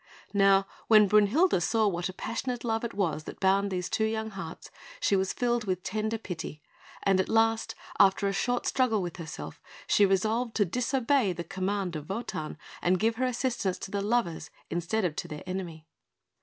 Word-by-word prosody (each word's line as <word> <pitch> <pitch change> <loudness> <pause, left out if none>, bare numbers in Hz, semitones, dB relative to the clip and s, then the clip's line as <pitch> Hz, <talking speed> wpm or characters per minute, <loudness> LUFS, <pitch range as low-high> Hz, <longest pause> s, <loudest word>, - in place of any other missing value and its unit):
Now 195 -1 +5 0.2
when 215 -2 +7
Brünhilde 210 - +4
saw 220 +5 +2
what 175 -2 -1
a - - -6
passionate 235 +4 -4
love 225 -1 -1
it 235 -3 -4
was 165 -6 -1
that - - -8
bound 195 +1 +3
these 180 -2 -2
two 220 - 0
young 220 0 -2
hearts, 190 -5 -8 0.3
she 200 - +2
was 190 0 +1
filled 240 -2 0
with 185 -2 -2
tender 220 +2 -2
pity; 170 -7 -6 0.4
and 195 -1 +3
at 190 - 0
last, 225 0 +2 0.2
after 200 0 +5
a 195 - 0
short 245 +5 0
struggle 225 -7 +2
with 175 0 -5
herself, 160 -3 -7 0.2
she 205 - +4
resolved 220 +5 0
to 205 - +3
disobey 250 - +1
the 170 - -5
command 190 0 -2
of 155 +3 -6
Wotan, 195 -8 -4 0.2
and 180 +1 +2
give 225 +1 +1
her 255 - +1
assistance 240 -6 -1
to 195 - -8
the 200 - -1
lovers, 210 -5 0 0.2
instead 180 +5 0
of 160 -4 -1
to - - -3
their 150 -3 -7
enemy. 180 -4 -5
200 Hz, 185 wpm, -29 LUFS, 185-225 Hz, 0.4 s, when